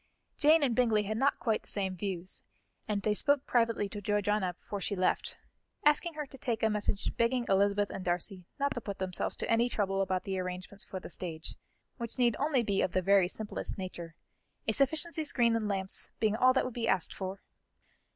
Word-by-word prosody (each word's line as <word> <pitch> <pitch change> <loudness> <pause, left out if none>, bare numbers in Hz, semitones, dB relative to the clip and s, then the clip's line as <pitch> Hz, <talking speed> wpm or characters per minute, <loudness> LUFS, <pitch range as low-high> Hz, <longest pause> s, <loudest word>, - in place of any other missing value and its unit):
Jane 310 +1 +5
and 250 -5 +2
Bingley 225 -4 +3
had 215 +2 -2
not 275 +2 +3
quite 225 -3 0
the - - -19
same 190 -2 -1
views, 185 -1 -4 0.5
and 205 -2 -1
they 215 - +2
spoke 285 +5 +2
privately 230 -4 +2
to 205 +1 -6
Georgiana 205 -2 +1
before 200 +2 -6
she 200 - -1
left, 185 -1 0 0.5
asking 300 +3 +3
her 300 -1 -3
to 270 -1 -11
take 235 -3 -2
a 220 - +4
message 205 -1 -1
begging 240 +1 +2
Elizabeth 200 +1 +2
and 190 - -5
Darcy 180 +1 -2
not 280 0 +1
to 240 - -4
put 200 -2 -5
themselves 185 -1 -1
to - - -4
any 230 +2 +3
trouble 195 -4 0
about 185 -1 0
the 190 -1 -2
arrangements 185 +2 -5
for 190 - -6
the 180 - -9
stage, 160 -2 -4 0.4
which 235 -1 -5
need 240 -3 +3
only 280 -4 +2
be 200 -3 +1
of 180 - 0
the 185 - +1
very 195 -1 +5
simplest 210 +3 -4
nature, 175 -3 -6 0.5
a - - +4
sufficiency 315 +6 +2
screen 240 -6 +2
and 220 -2 0
lamps 195 -2 -3
being 215 -1 +2
all 255 +3 +5
that 260 - +2
would 255 - -4
be 230 -1 -2
asked 180 - +1
for. 190 0 -5
210 Hz, 205 wpm, -31 LUFS, 190-240 Hz, 0.5 s, Jane